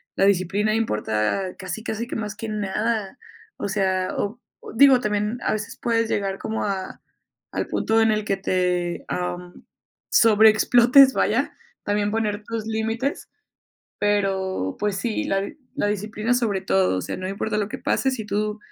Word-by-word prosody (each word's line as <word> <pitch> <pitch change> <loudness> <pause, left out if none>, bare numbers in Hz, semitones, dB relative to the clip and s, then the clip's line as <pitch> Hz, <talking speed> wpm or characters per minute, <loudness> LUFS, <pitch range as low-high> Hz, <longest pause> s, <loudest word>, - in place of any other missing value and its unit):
la 195 - +3
disciplina 200 +2 +2
importa 110 - 0 0.2
casi, 185 +3 -5
casi 230 0 -3
que - - -5
más 210 -1 -4
que 220 +1 -6
nada. 210 +2 -2 0.4
O 205 - -3
sea, 190 -2 0
o 215 +4 -3 0.4
digo, 265 +1 +7
también, 210 0 -1
a - - +1
veces 215 -1 -5
puedes 230 -1 +1
llegar 195 -1 -1
como 220 0 -3
a 195 -2 -4 0.5
al - - -2
punto 225 0 +1
en 225 0 +4
el 215 0 0
que 195 -2 0
te, 180 -2 -1
am, 180 0 -5 0.5
sobreexplotes, 235 +4 +6
vaya, - - +1 0.3
también 205 0 0
poner 210 -1 -1
tus 225 0 -4
límites, 225 +5 -2 0.7
pero, 195 - 0
pues, 205 -2 -1
sí, 215 +2 -2
la 195 0 -1 0.2
la 280 - 0
disciplina 210 +3 -1
sobre 220 -6 0
todo, 190 - +2
o - - -1
sea, - - -5
no 185 0 -5
importa 210 +2 -2
lo 205 -1 -1
que 265 - -6
pase, 265 0 +1
si 230 -5 -5
tú 210 +1 -1
210 Hz, 160 wpm, -23 LUFS, 195-225 Hz, 0.7 s, digo